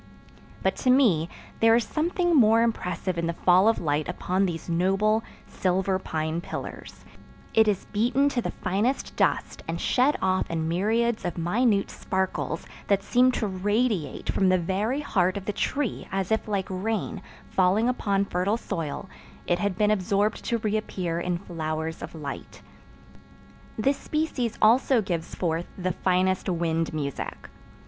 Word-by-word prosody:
But - - +2
to 260 - 0
me 210 - +4 0.3
there 225 0 +6
is 235 - +3
something 345 - 0
more 225 -3 +6
impressive 185 -5 -2
in 165 - -1
the 170 - -1
fall 180 +4 +4
of 225 - +4
light 150 0 -1
upon 185 +2 0
these 165 -2 -5
noble, 195 +6 +2 0.2
silver 190 +1 0
pine 160 -1 -2
pillars: - - -8 0.5
it 220 -1 +5
is 200 -3 0
beaten 245 +6 +2
to 255 -3 -1
the - - -3
finest 205 +9 -1
dust - - 0
and 165 +1 -3
shed 265 +4 +2
off 185 0 0
in 160 -1 -1
myriads 220 +7 +1
of 175 - -3
minute 200 +4 +1
sparkles 190 0 -2 0.2
that 200 -1 +2
seem 250 +4 +4
to 225 - -1
radiate 205 - -1
from 190 - +2
the 185 - +4
very 200 - -1
heart 185 -9 +1
of 195 - -6
the 210 - -2
tree 280 0 -2
as 195 +1 -2
if 220 - +1
like 200 -3 -1
rain, 200 +2 -3 0.3
falling 190 +5 +3
upon 200 -5 +1
fertile 195 +4 0
soil, 165 -4 -4 0.4
it 175 0 +1
had 200 -1 -1
been 210 0 +3
absorbed 205 +1 +1
to 235 - +1
reappear 205 -6 -2
in 175 0 -1
flowers 160 -3 -4
of - - -7
light. 145 -3 -7 1.1
This 270 +6 +2
species 305 -7 -2
also 245 +3 +5
gives 170 -4 -3
forth 170 -1 -1
the 185 -1 -1
finest 185 +2 +1
wind 165 -2 0
music. 145 -3 -5
195 Hz, 155 wpm, -26 LUFS, 175-225 Hz, 1.1 s, there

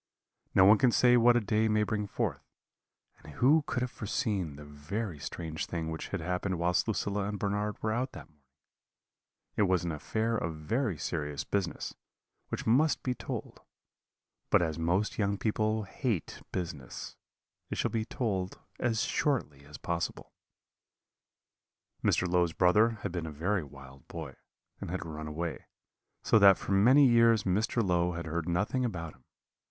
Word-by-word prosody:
"No 95 - +7
one 105 +2 +7
can 130 -3 +4
say 125 +1 +5
what 120 0 +6
a - - +4
day 110 0 +1
may 110 0 +2
bring 105 -1 -2
forth; - - -2 0.8
and 75 - -12
who 145 - +4
could 125 - -1
have 125 - -3
foreseen 100 - -2
the 75 +1 -10
very 75 +5 -5
strange 80 +1 -5
thing 80 -2 -3
which 80 - -5
had 100 - -4
happened 90 +2 -2
whilst 90 +4 +1
Lucilla 100 -2 -1
and 105 0 -3
Bernard 105 +1 -1
were 110 - +1
out 125 +4 -1
that - - -10
morning? 75 -2 -32 1.1
It - - +1
was 90 -1 +2
an 85 - -2
affair 110 +9 -1
of 80 -7 -2
very 105 - -1
serious 75 -3 -3
business, 95 +2 -2 0.6
which - - -4
must 145 +7 +3
be 125 - 0
told: - - -6 0.9
but - - +4
as 80 -1 -2
most 90 +8 0
young 100 -1 +1
people 110 +1 0
hate 105 - -3
business, 80 -8 -5 0.5
it - - -4
shall - - 0
be 110 -1 0
told 100 -7 -2 0.2
as 115 -2 +1
shortly 75 - -1
as 75 +1 -10
possible. 85 -1 -4 1.7
"Mr. 90 - +2
Low's 90 -2 +2
brother 105 +7 +4
had 100 - -2
been 85 -2 -3
a - - -5
very 90 +5 -1
wild 70 -2 -14
boy, 80 -5 -7 0.5
and - - -6
had 90 0 -3
run 80 -1 -6
away; 80 +2 -4 0.6
so 110 - +5
that 100 -2 +8
for - - -6
many 125 +9 +6
years 115 -3 +5
Mr. 105 +3 +1
Low 90 0 +2
had 85 0 -5
heard 85 +1 -3
nothing 100 +9 0
about 85 -9 -3
him. 65 - -25
95 Hz, 165 wpm, -30 LUFS, 80-110 Hz, 1.7 s, that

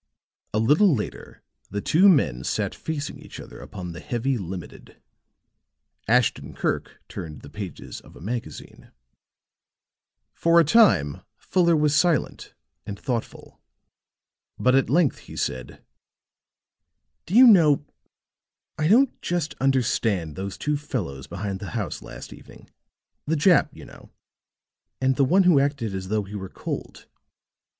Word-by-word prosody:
A - - -1
little 150 - +4
later 105 - -7 0.3
the 100 - -3
two 180 - +4
men 65 - +2
sat - - -2
facing 145 -3 -5
each - - -11
other - - -11
upon 90 -4 -8
the 85 - -8
heavy 130 0 -2
"Limited"; 95 -5 -8 1.1
Ashton 125 +1 +1
Kirk - - -3
turned 80 -4 -8
the 70 - -12
pages 100 -6 -8
of - - -17
a - - -13
magazine. 115 +8 -7 1.4
For 170 0 +4
a - - +6
time 155 - +4 0.2
Fuller 170 -2 +2
was 150 -1 +2
silent 165 -2 0 0.3
and 100 -1 -7
thoughtful. 120 -4 -5 1.0
But 125 - +2
at 135 0 +3
length 155 -1 +2
he - - -13
said: 65 -1 -4 1.4
"Do 180 - -3
you 255 +2 +9
know 160 - +6 0.9
I 155 - +2
don't 245 +8 +3
just 170 -3 -2
understand 115 - 0
those 95 0 -5
two 150 0 -1
fellows 95 - -5
behind 95 +2 -5
the 100 - -7
house - - -4
last - - -10
evening, - - -16 0.6
the 160 - +1
Jap, 160 +2 +4
you - - -13
know - - -15 0.9
and 130 0 +2
the 140 - +3
one 190 +8 +4
who 175 -6 +5
acted 135 -7 -1
as 95 -1 -5
though 105 +1 0
he 100 +1 -11
were 95 -2 -6
cold. - - -7
130 Hz, 140 wpm, -24 LUFS, 100-160 Hz, 1.4 s, you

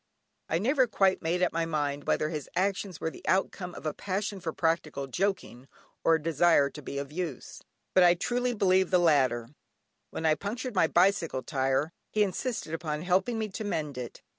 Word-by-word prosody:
I 160 - +2
never 260 - +2
quite 195 -3 +2
made 175 +3 0
up - - +1
my 165 0 0
mind 145 -2 -2
whether 150 - +1
his 150 -4 -5
actions 190 -1 -1
were 160 - -2
the - - -12
outcome 185 -1 0
of - - -10
a 155 - -1
passion 200 +1 -3
for 170 -2 -3
practical 160 -4 -1
joking, 135 -4 -2 0.4
or 165 - +5
a - - 0
desire 160 -3 +3
to 150 - -9
be 140 - -6
of 140 0 -4
use, 160 -5 -5 0.3
but 185 - +6
I 175 0 +6
try 240 +7 -1
to 245 - -2
believe 190 -2 +3
the 185 - +4
latter. 130 -9 +2 0.6
When 160 - -5
I 155 - +5
punctured 225 - -4
my 180 -4 +3
bicycle 170 -6 +2
tyre 135 +3 0 0.2
he 215 - +2
insisted 205 -3 -3
upon 155 -1 -3
helping 190 +6 +1
me 220 -1 -2
to 205 - -5
mend 155 -8 -2
it. 125 -2 -7
170 Hz, 195 wpm, -29 LUFS, 150-195 Hz, 0.6 s, but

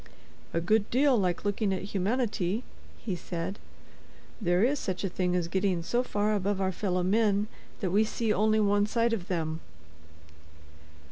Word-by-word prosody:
"A 165 - 0
good 210 +5 +2
deal 270 +2 +4
like 185 -3 0
looking 205 0 0
at 190 - -2
humanity," 210 0 0 0.4
he 195 -6 -1
said; 175 +3 -5 0.8
"there 175 0 +2
is 275 +4 +2
such 185 -1 -3
a 195 - 0
thing 180 0 0
as 175 -2 0
getting 185 -1 0
so 240 +8 +1
far 210 -3 0
above 200 -1 0
our 190 -1 +1
fellow 185 -1 -1
men 205 +1 +2 0.3
that 185 -4 0
we 205 +3 +4
see 220 0 0
only 215 +1 +3
one 205 0 +3
side 230 +1 +1
of 195 -5 -3
them." 160 -3 -2
200 Hz, 160 wpm, -29 LUFS, 180-220 Hz, 0.8 s, deal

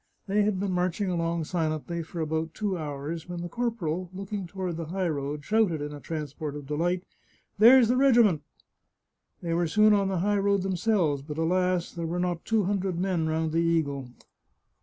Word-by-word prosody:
They 205 +1 +2
had 205 -2 +1
been 195 0 -1
marching 180 +2 0
along 170 -1 -1
silently 160 0 -2
for 165 +1 -6
about 160 +1 -2
two 205 -3 -1
hours 155 +1 -5
when 175 -1 -4
the - - -3
corporal, 185 -5 -2
looking 195 0 -5
toward 180 -2 -4
the 165 -2 -5
high 185 +2 -1
road, 145 -1 -3
shouted 210 -7 +2
in 145 0 -5
a 145 - -8
transport 150 +1 -5
of 145 -1 -7
delight, 175 +5 -1 0.3
" - - -37
There's 240 +2 +8
the 250 +2 +2
regiment! 235 - +5 0.5
" - - -51
They 170 -1 -1
were 170 0 +1
soon 215 +6 +5
on 200 -1 +2
the 190 -1 -1
high 205 +3 +1
road 200 -1 +2
themselves, 180 -6 +1
but 150 +2 -7
alas, 180 +1 +1
there 170 -2 -4
were 170 +2 -2
not 175 -1 -2
two 220 -2 +2
hundred 190 -2 -1
men 180 -3 0
round 160 0 0
the 165 - +1
eagle 150 -6 0
175 Hz, 195 wpm, -27 LUFS, 160-195 Hz, 0.5 s, There's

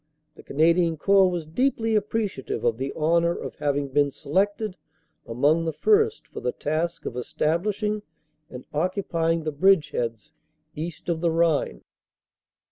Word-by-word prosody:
"The - - -14
Canadian 165 +2 +2
Corps 195 +3 +4
was 175 -3 -3
deeply 225 - 0
appreciative 210 -7 -2
of 115 -1 +1
the 135 +1 -2
honor 170 +2 +2
of - - -6
having 145 -1 -1
been 145 +1 +2
selected 195 +8 -1 0.5
amongst 145 +8 +2
the 160 - -1
first 440 - +2
for - - -9
the 125 - -1
task 160 +6 -2
of 120 - -4
establishing 200 - -1 0.5
and 125 -3 -9
occupying 165 -1 0
the 155 -1 -3
bridgeheads 150 - +1 0.4
east 160 +1 -6
of 165 -2 -1
the 170 - +2
Rhine. 165 - +1
165 Hz, 135 wpm, -25 LUFS, 145-195 Hz, 0.5 s, Corps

